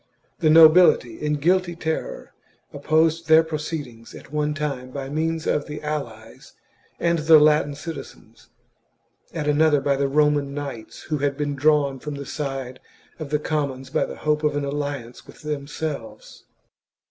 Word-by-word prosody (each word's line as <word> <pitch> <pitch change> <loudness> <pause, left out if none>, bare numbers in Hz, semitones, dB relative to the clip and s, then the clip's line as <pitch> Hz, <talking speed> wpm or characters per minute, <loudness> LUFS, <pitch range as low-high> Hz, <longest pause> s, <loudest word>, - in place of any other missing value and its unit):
The 160 - +3
nobility, 160 -6 +6
in 150 0 0
guilty 175 +3 +1
terror, 160 -1 -4 0.4
opposed 160 +3 +1
their 160 0 +6
proceedings 150 -7 -6
at - - -13
one 150 0 -1
time 140 -4 -4
by 135 0 -6
means 160 +2 -2
of 145 - 0
the 150 0 -6
allies 120 -8 -6 0.5
and 170 -1 +1
the 155 +1 +7
Latin 150 -1 +3
citizens, 165 +2 -10 0.8
at 155 -3 -4
another 150 0 +3
by 140 0 +1
the 140 0 +1
Roman 145 -1 +1
knights 140 -6 -7
who 150 -2 -3
had 140 0 -1
been 145 -1 -2
drawn 140 -1 +2
from 150 +2 -6
the 140 0 -7
side 135 -3 -5 0.4
of 155 -3 -6
the 150 - +1
commons 140 -4 -3
by 155 - +1
the - - -8
hope 150 0 -1
of 150 -1 +1
an 145 -1 -1
alliance 140 -4 -5
with - - -15
themselves. 150 -3 -6
150 Hz, 155 wpm, -23 LUFS, 140-155 Hz, 0.8 s, the